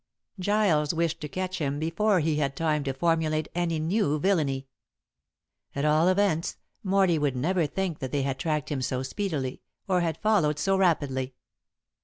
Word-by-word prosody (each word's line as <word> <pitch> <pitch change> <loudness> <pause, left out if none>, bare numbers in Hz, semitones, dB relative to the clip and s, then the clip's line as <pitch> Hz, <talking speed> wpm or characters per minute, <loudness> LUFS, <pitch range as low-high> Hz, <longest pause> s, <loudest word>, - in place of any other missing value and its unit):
Giles 180 -6 +2
wished 165 -1 -1
to 150 - -4
catch 185 +4 -4
him 145 -2 -1
before 180 +5 +1
he 155 0 0
had 140 -2 -1
time 155 -2 0
to 135 - -1
formulate 155 0 +1
any 170 -2 0
new 155 -1 +1
villainy. 145 -6 +1 1.1
At 140 +1 -1
all 155 +3 +4
events, 185 -3 +1 0.3
Morley 190 -4 +3
would 145 -3 0
never 165 +5 +1
think 185 -1 -3
that 130 -1 -4
they 145 -2 0
had 135 -1 -2
tracked 155 -3 -1
him 140 -3 -1
so 130 +1 -1
speedily, 140 -4 -3 0.3
or 185 -2 +2
had 165 -2 -1
followed 195 -9 +2
so 195 +6 +1
rapidly. 140 -8 +1
160 Hz, 165 wpm, -27 LUFS, 145-185 Hz, 1.1 s, all